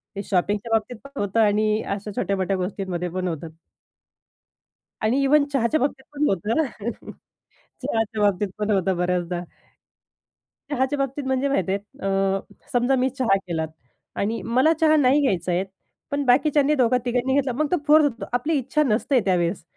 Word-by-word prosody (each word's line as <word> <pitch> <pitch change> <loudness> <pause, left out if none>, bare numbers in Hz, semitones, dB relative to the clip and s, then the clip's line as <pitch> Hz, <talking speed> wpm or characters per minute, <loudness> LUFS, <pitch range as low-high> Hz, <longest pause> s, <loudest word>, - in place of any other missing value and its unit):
ते 200 - -4
शॉपिंगच्या 205 +5 -1
बाबतीत 225 +2 0
पण 275 0 -9
होतं 205 +3 0
आणि 215 0 +3
अशा 210 +1 -7
छोट्यामोठ्या 190 0 0
गोष्टींमध्ये 180 -1 -3
पण 185 +1 -3
होतात. 160 -1 -5 1.5
आणि 240 +6 +2
इव्हन 285 +1 +4
चहाच्या 270 +4 +2
बाबतीत 270 -1 -1
पण 295 +1 +1
होतं 200 +5 -1
ना. 235 -5 -6 0.7
चहाच्या 220 -1 -1
बाबतीत 205 0 +2
पण 210 0 -2
होतं 190 -2 +1
बऱ्याचदा. 180 0 -1 1.3
चहाच्या 265 0 0
बाबतीत 275 +1 -2
म्हणजे 265 +1 +1
माहिती 190 -8 0
आहे 200 - -1 0.3
अ, 195 0 +1 0.3
समजा 245 +2 +3
मी 260 - +2
चहा 250 -7 +1
केलात. 160 -2 -2 0.5
आणि 220 +3 -1 0.2
मला 315 +5 +5
चहा 310 -1 +5
नाही 285 +1 +4
घ्यायचा 185 -9 0
आहे. 175 +2 +1 0.5
पण 285 0 0
बाकीच्यांनी 290 +3 +3
दोघा 250 -2 +3
तिघांनी 250 +2 0
घेतला 275 -2 +1
मग 300 +5 -1
तो 360 - +3
फोर्स 305 +1 +7
होतो 250 -5 -2
आपली 275 +7 0
इच्छा 275 +4 +1
नसते 250 +2 +2
त्यावेळेस. 175 -1 0
225 Hz, 160 wpm, -23 LUFS, 195-270 Hz, 1.5 s, फोर्स